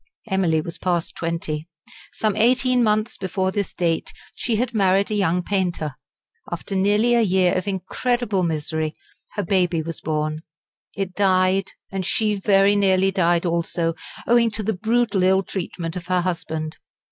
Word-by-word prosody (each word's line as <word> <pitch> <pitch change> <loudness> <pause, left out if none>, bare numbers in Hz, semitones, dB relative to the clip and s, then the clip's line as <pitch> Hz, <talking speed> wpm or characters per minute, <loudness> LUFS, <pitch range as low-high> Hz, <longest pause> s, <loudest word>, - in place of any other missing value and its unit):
Emily 180 -5 +2
was 170 +2 -7
past 175 -2 -1
twenty. 165 -1 -3 0.4
Some 215 -2 0
eighteen 250 +2 +3
months 215 0 +1
before 190 0 -1
this 200 0 -2
date 165 -2 -1 0.2
she 235 - -1
had 240 +2 -1
married 195 -1 +2
a - - +1
young 180 -3 +1
painter. 175 -7 -1 0.6
After 175 +3 -4
nearly 210 +5 +3
a 235 - +4
year 185 -3 +3
of 185 +1 -2
incredible 200 +2 -1
misery 160 -1 -2 0.4
her 205 - -1
baby 175 -3 +1
was 165 +1 -6
born. 155 0 -2 0.5
It 195 -2 -3
died, 190 0 +2 0.2
and 195 -1 -2
she 210 +3 +1
very 200 0 +3
nearly 195 -1 +3
died 175 -2 +2
also, 170 0 0 0.3
owing 235 -1 +4
to 215 0 -3
the 220 +2 0
brutal 225 +1 +1
ill 190 +1 +4
treatment 170 -3 -5
of 180 -1 -6
her 185 -1 +2
husband. 165 -3 -3
190 Hz, 155 wpm, -22 LUFS, 170-205 Hz, 0.6 s, a